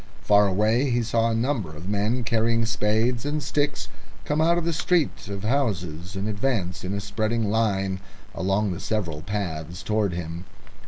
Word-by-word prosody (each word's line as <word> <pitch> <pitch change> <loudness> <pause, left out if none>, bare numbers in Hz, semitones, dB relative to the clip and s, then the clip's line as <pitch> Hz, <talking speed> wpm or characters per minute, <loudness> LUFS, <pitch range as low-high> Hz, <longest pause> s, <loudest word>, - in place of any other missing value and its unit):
Far 105 0 +5
away 110 +8 +2
he 120 -1 +2
saw 115 0 +2
a 115 - 0
number 115 - -1
of 85 +5 -8
men 105 +5 0
carrying 115 0 +2
spades 110 +2 +1
and 145 +2 -1
sticks 145 -1 0 0.4
come 150 +1 +1
out 170 +2 +4
of 170 - -1
the 170 - +1
street 165 - +1
of 100 -1 -5
houses, 90 - -1
and 95 +2 -2
advance 105 -4 -1
in 95 +2 -2
a - - -1
spreading 110 +2 -1
line 100 -4 +1 0.3
along 95 +2 +1
the 85 - -4
several 85 -9 -2
paths 85 -3 -4
towards 105 -4 +1
him. 85 +1 -5
105 Hz, 170 wpm, -25 LUFS, 95-115 Hz, 0.4 s, Far